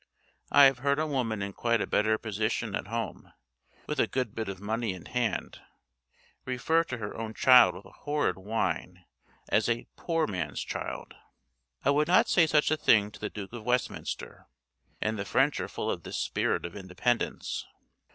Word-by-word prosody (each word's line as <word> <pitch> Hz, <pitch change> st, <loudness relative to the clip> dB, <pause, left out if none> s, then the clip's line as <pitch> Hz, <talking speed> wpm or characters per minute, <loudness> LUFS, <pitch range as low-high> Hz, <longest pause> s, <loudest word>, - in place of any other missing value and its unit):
I 145 Hz, -, +8 dB
have 135 Hz, -2 st, +4 dB
heard 140 Hz, +2 st, +1 dB
a 155 Hz, -, +1 dB
woman 120 Hz, -8 st, -1 dB
in 100 Hz, 0 st, -5 dB
quite 115 Hz, +2 st, +1 dB
a -, -, 0 dB
better 110 Hz, +1 st, +2 dB
position 110 Hz, 0 st, -2 dB
at -, -, -4 dB
home, 115 Hz, +1 st, -5 dB, 0.5 s
with -, -, -3 dB
a -, -, +3 dB
good 125 Hz, -5 st, -2 dB
bit 110 Hz, -3 st, -3 dB
of 95 Hz, -1 st, -6 dB
money 110 Hz, +1 st, -2 dB
in 90 Hz, -, -12 dB
hand, 125 Hz, -2 st, -2 dB, 0.8 s
refer 145 Hz, +6 st, +1 dB
to 130 Hz, -, -5 dB
her 105 Hz, -2 st, -5 dB
own 110 Hz, -1 st, -5 dB
child 125 Hz, -9 st, +7 dB
with 90 Hz, -, -11 dB
a -, -, -14 dB
horrid 145 Hz, -10 st, -1 dB
whine 95 Hz, -3 st, -3 dB, 0.4 s
as -, -, +2 dB
'a 115 Hz, 0 st, 0 dB
poor 165 Hz, -2 st, 0 dB
man's 90 Hz, -7 st, -3 dB
child.' -, -, -5 dB, 0.7 s
I 140 Hz, -, +5 dB
would 150 Hz, +2 st, +2 dB
not 180 Hz, +2 st, +5 dB
say 170 Hz, -3 st, +5 dB
such 150 Hz, -1 st, +3 dB
a 155 Hz, -, +3 dB
thing 105 Hz, -7 st, +4 dB
to -, -, -13 dB
the 105 Hz, -, -3 dB
Duke 100 Hz, 0 st, -8 dB
of 120 Hz, -3 st, -7 dB
Westminster. 125 Hz, +2 st, -3 dB, 0.5 s
And 110 Hz, 0 st, -1 dB
the -, -, -1 dB
French 135 Hz, +7 st, +2 dB
are -, -, -3 dB
full -, -, -2 dB
of -, -, -4 dB
this -, -, -5 dB
spirit -, -, 0 dB
of 85 Hz, -, -7 dB
independence. 100 Hz, +5 st, -2 dB
115 Hz, 185 wpm, -29 LUFS, 100-135 Hz, 0.8 s, I